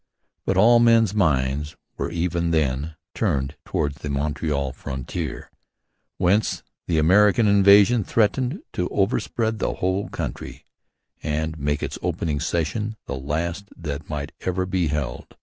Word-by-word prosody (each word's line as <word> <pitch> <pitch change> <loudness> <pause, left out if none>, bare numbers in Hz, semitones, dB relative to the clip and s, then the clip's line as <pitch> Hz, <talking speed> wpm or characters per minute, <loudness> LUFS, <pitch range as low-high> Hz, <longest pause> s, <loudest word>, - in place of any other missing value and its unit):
But 95 - +1
all 120 +4 +6
men's 115 -3 +5
minds 75 -5 +1 0.2
were - - -3
even 85 0 -1
then 75 -1 0 0.2
turned 70 0 -1
towards 75 -3 -1
the 75 - -4
Montreal 70 -1 -1
frontier, 70 +3 -5 0.7
whence 95 +4 +1 0.2
the 85 - +1
American 100 +7 +5
invasion 100 +3 +6
threatened 125 - 0
to 90 - -1
overspread 110 +2 0
the - - 0
whole 95 +2 -1
country - - -6 0.6
and 80 +1 -2
make 75 +1 -1
this - - -4
opening 75 -3 -1
session 85 +8 -1
the - - -4
last 80 +8 -3
that 75 -3 -6
might 75 0 -4
ever 95 0 -1
be 90 -2 0
held. 75 -3 -4
85 Hz, 130 wpm, -23 LUFS, 75-100 Hz, 0.7 s, all